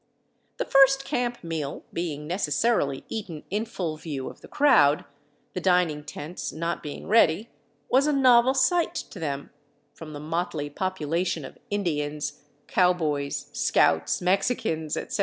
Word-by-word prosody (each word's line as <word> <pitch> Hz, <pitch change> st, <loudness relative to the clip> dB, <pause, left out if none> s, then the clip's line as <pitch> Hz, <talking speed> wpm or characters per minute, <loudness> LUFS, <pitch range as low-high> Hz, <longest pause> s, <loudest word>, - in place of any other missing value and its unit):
The -, -, -1 dB
first 270 Hz, 0 st, +5 dB
camp 245 Hz, -5 st, -2 dB
meal 160 Hz, -4 st, -4 dB
being 155 Hz, -4 st, -3 dB
necessarily 155 Hz, -, 0 dB
eaten 190 Hz, -9 st, -6 dB
in 210 Hz, +3 st, 0 dB
full 170 Hz, -8 st, -4 dB
view 145 Hz, -5 st, -5 dB
of -, -, -18 dB
the -, -, -12 dB
crowd, 215 Hz, -, +4 dB, 0.5 s
the 180 Hz, -, -3 dB
dining 180 Hz, -5 st, +2 dB
tents 150 Hz, +3 st, -6 dB
not 165 Hz, +2 st, -3 dB
being 145 Hz, -, -7 dB
ready, 210 Hz, 0 st, +3 dB, 0.4 s
was 270 Hz, +3 st, +3 dB
a -, -, +3 dB
novel 260 Hz, -2 st, +5 dB
sight 340 Hz, +6 st, +2 dB
to 190 Hz, -, -6 dB
them, 140 Hz, -3 st, -4 dB, 0.4 s
from 155 Hz, -2 st, -10 dB
the 145 Hz, -, -6 dB
motley 155 Hz, -1 st, -3 dB
population 170 Hz, -2 st, -2 dB
of -, -, -12 dB
Indians, 150 Hz, -6 st, -2 dB, 0.2 s
cowboys, 155 Hz, -6 st, 0 dB
scouts, 80 Hz, -, +2 dB
Mexicans, 180 Hz, -5 st, 0 dB
etc. -, -, -4 dB
170 Hz, 140 wpm, -26 LUFS, 150-220 Hz, 0.5 s, first